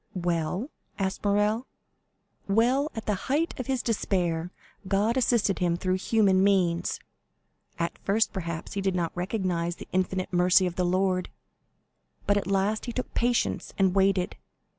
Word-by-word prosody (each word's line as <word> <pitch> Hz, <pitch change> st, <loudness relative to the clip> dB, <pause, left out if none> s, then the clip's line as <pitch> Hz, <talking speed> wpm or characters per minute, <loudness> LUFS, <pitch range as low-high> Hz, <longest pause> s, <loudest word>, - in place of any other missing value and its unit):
"Well?" 175 Hz, -, -1 dB, 0.3 s
asked 190 Hz, -1 st, -2 dB
Morrel. 210 Hz, +4 st, +1 dB, 0.8 s
"Well, 245 Hz, +8 st, +2 dB
at 225 Hz, -, -5 dB
the 210 Hz, -, +1 dB, 0.2 s
height 310 Hz, +5 st, +1 dB
of 255 Hz, -, -4 dB
his 260 Hz, -3 st, -1 dB
despair 175 Hz, -7 st, 0 dB, 0.4 s
God 205 Hz, +4 st, +2 dB
assisted 235 Hz, -6 st, +2 dB
him 175 Hz, -1 st, +1 dB
through 185 Hz, +1 st, 0 dB
human 195 Hz, -2 st, +3 dB
means. 180 Hz, -4 st, +2 dB, 0.8 s
At 170 Hz, 0 st, -2 dB
first, 215 Hz, +3 st, +1 dB
perhaps, 170 Hz, -4 st, -5 dB
he 200 Hz, -, -2 dB
did 190 Hz, -1 st, 0 dB
not 170 Hz, -2 st, -1 dB
recognize 180 Hz, -2 st, -1 dB
the -, -, -10 dB
infinite 185 Hz, 0 st, -1 dB
mercy 180 Hz, +2 st, +4 dB
of 180 Hz, -, -2 dB
the 180 Hz, -, 0 dB
Lord, 185 Hz, 0 st, +1 dB, 1.0 s
but 205 Hz, -, +3 dB
at 200 Hz, -3 st, -1 dB
last 200 Hz, +2 st, 0 dB
he -, -, -2 dB
took 255 Hz, +2 st, -4 dB
patience 240 Hz, 0 st, 0 dB
and 190 Hz, -2 st, +3 dB
waited. 195 Hz, -2 st, +2 dB
195 Hz, 150 wpm, -27 LUFS, 180-215 Hz, 1.0 s, mercy